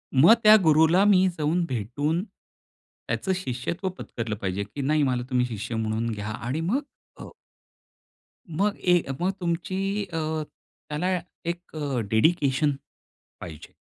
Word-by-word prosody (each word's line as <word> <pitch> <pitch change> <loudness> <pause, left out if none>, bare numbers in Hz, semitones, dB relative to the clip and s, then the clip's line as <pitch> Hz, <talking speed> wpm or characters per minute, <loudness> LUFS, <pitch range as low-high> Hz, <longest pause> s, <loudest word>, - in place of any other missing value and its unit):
मग 160 +12 +8
त्या 215 0 +9
गुरूला 160 +4 +5
मी 190 -2 +5
जाऊन 160 +4 +1
भेटून, 140 - -1
त्याचं 190 -3 -8
शिष्यत्व 170 +4 -3
पत्करलं 115 -3 -4
पाहिजे, 95 +1 -2
की 105 +8 -7
नाही 150 +2 +2
मला 125 -2 0
तुम्ही 125 -1 +2
शिष्य 115 -1 -5
म्हणून 110 +1 -1
घ्या 105 -1 -5
आणि 130 +8 -2
मग 220 - 0 0.4
अ - - -7 1.3
मग 200 +6 0
ए 180 -2 +4 0.2
मग 185 +2 +2
तुमची 190 +4 -2
अ, 165 - -1 0.7
त्याला 180 +5 0 0.3
एक 175 +1 -2
अ, 145 -5 -2
डेडिकेशन 140 +3 +2 0.7
पाहिजे. 80 -4 -10
155 Hz, 130 wpm, -25 LUFS, 120-180 Hz, 1.3 s, त्या